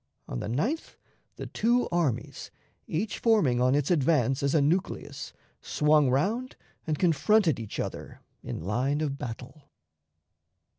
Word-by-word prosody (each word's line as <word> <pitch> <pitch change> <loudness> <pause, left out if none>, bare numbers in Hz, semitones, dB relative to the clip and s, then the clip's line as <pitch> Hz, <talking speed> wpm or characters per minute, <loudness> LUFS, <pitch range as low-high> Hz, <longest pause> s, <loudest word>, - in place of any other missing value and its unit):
On - - -4
the - - -4
9th 210 - -2 0.4
the - - -7
two 240 +3 +1
armies, 145 -9 -1 0.4
each 195 +8 -2
forming 175 - +3
on 130 +2 +3
its 145 +3 +1
advance 135 -5 +2
as 140 +2 +1
a - - +5
nucleus, 160 +6 -1 0.3
swung 150 -2 +3
round 215 - 0 0.3
and 155 -1 0
confronted 165 - +3
each 110 -3 -6
other - - -5 0.2
in - - -6
line 130 - 0
of 140 -3 -2
battle. 125 +5 -8
150 Hz, 135 wpm, -28 LUFS, 130-180 Hz, 0.4 s, a